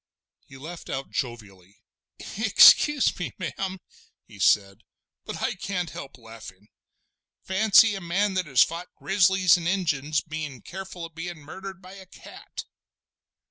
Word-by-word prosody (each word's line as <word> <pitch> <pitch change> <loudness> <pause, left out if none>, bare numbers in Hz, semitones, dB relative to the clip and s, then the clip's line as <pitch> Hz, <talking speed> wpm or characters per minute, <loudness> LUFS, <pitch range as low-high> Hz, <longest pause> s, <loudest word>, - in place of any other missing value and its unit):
He 135 - -13
laughed 165 +5 -10
out 135 +1 -5
jovially. 105 - -6 0.6
"Excuse 220 +7 +5
me, 180 - -4
ma'am," 190 +2 -4 0.5
he 105 - -16
said, 100 0 +2 0.5
"but - - -6
I - - 0
can't 180 -4 -4
help 135 -1 -9
laughin'. 110 -4 -13 0.7
Fancy 210 +3 +5
a 195 - -5
man 190 +4 0
that 185 -3 -1
has 130 -4 +5
fought 170 +2 -6
grizzlies 190 -2 +3
an' 165 - -4
Injuns 155 -6 0
bein' 150 -5 -7
careful 190 -2 -8
of 165 - -12
bein' 170 +1 -6
murdered 190 +5 -10
by 185 +1 -12
a 190 -1 -13
cat!" - - -11
170 Hz, 140 wpm, -25 LUFS, 135-190 Hz, 0.7 s, Excuse